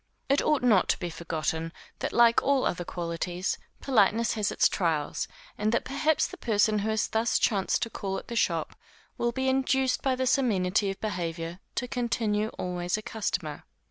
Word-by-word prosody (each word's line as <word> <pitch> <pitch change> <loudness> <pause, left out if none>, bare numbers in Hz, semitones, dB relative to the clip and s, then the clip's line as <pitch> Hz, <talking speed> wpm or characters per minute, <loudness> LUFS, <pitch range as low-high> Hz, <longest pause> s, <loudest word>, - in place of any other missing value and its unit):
But 275 +1 +3
it - - -3
ought 300 -4 +2
not 215 -7 +4
to - - +3
be 175 -1 -4
forgotten, 160 0 -3 0.3
that - - -2
like 235 -1 +5
all 275 -1 +2
other 175 - -1
qualities, 175 +1 -3 0.2
politeness 230 -2 +3
has 210 -2 0
its - - +4
trials, 160 -5 -1 0.3
and 210 +1 +1
that 235 - 0
perhaps 300 +3 +1
the 370 - -7
person 215 - +2
who 210 +2 -1
has 220 0 +1
thus 225 +1 +1
chanced 195 -4 +1
to 230 - -3
call 195 -2 -3
at - - -8
their 235 - -5
shop, - - 0 0.4
will 240 - +1
be 265 +2 -2
induced 265 0 +2
by 265 -1 +1
this 260 +1 +2
amenity 200 -4 +1
of 195 - -5
behavior, 170 -4 -3 0.2
to 250 - -1
continue 230 -4 0
always 180 +1 -2
a 215 - -7
customer. 220 -1 -3
215 Hz, 185 wpm, -28 LUFS, 180-245 Hz, 0.4 s, like